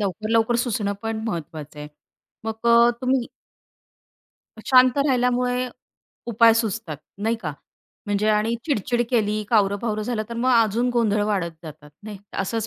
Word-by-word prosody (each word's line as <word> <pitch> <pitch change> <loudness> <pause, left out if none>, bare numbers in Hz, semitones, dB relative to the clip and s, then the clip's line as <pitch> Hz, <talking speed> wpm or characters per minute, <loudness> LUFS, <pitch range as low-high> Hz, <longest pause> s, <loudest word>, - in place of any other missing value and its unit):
लवकर, 210 +2 -3
लवकर 225 +1 +2
सुचणं 210 -4 -1
पण 225 0 -3
महत्त्वाचं 155 -5 -6
आहे. 150 0 -7 0.6
मग 225 +1 -5
अ, 235 0 +6
तुम्ही 255 -1 0 1.3
शांत 255 +2 +4
राहिल्यामुळे 250 -1 +1 0.6
उपाय 230 0 +5
सुचतात, 220 -7 -2 0.2
नाही 225 +3 0
का? 155 -4 -4 0.5
म्हणजे 205 +1 0
आणि 215 +2 +2
चिड-चिड 240 -4 0
केली, 215 -3 +1
कावरं-बावरं 210 0 +1
झालं, 215 0 -2
तर 235 - -6
मग 245 +2 +1
अजून 230 +1 +2
गोंधळ 215 -3 +1
वाढत 190 -5 -1
जातात, 150 -2 -11
नाही? 210 -1 -8 0.2
असंच 220 +3 -2
225 Hz, 135 wpm, -23 LUFS, 205-240 Hz, 1.3 s, अ